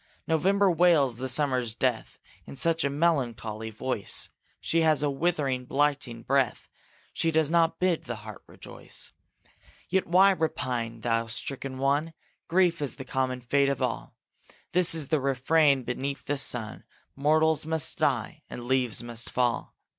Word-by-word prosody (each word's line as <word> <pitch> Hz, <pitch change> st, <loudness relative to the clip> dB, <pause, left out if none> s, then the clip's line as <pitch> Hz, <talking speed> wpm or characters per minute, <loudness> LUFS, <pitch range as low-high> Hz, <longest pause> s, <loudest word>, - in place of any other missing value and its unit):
November 190 Hz, +5 st, +3 dB
wails 160 Hz, -8 st, +3 dB
the 130 Hz, +1 st, -3 dB
summer's 130 Hz, -4 st, 0 dB
death 125 Hz, -2 st, -1 dB, 0.3 s
In -, -, -9 dB
such 165 Hz, +3 st, +2 dB
a 140 Hz, -, +1 dB
melancholy 120 Hz, -8 st, -1 dB
voice, 110 Hz, -1 st, -2 dB, 0.3 s
She 165 Hz, -, +1 dB
has 155 Hz, -2 st, +3 dB
a 145 Hz, -, +1 dB
withering, 140 Hz, -4 st, -1 dB
blighting 135 Hz, -4 st, 0 dB
breath; 135 Hz, -3 st, 0 dB, 0.4 s
She 165 Hz, -, 0 dB
does 160 Hz, -1 st, +1 dB
not 165 Hz, -1 st, +3 dB
bid 180 Hz, -3 st, +1 dB
the 120 Hz, -, -4 dB
heart 110 Hz, -2 st, -9 dB
rejoice. -, -, -9 dB, 0.8 s
Yet 190 Hz, +1 st, +1 dB
why 190 Hz, +3 st, +6 dB
repine, 125 Hz, -9 st, -2 dB
thou 115 Hz, -1 st, 0 dB
stricken 130 Hz, +3 st, -4 dB
one? 145 Hz, +4 st, 0 dB, 0.3 s
Grief 170 Hz, -2 st, +2 dB
is 145 Hz, -, -2 dB
the 130 Hz, -, -8 dB
common 130 Hz, -1 st, -2 dB
fate 140 Hz, +3 st, +2 dB
of 140 Hz, -, -1 dB
all. -, -, -3 dB, 0.6 s
This 180 Hz, -1 st, +4 dB
the 155 Hz, +2 st, +1 dB
refrain 140 Hz, +1 st, +3 dB
beneath 130 Hz, +2 st, -4 dB
the 145 Hz, -1 st, -1 dB
sun: 110 Hz, -5 st, -2 dB, 0.3 s
Mortals 155 Hz, +2 st, +2 dB
must 160 Hz, -3 st, -2 dB
die, -, -, 0 dB
and 120 Hz, -, -7 dB
leaves 125 Hz, -3 st, +1 dB
must 120 Hz, -1 st, -2 dB
fall. 120 Hz, -1 st, -1 dB
140 Hz, 145 wpm, -27 LUFS, 125-160 Hz, 0.8 s, why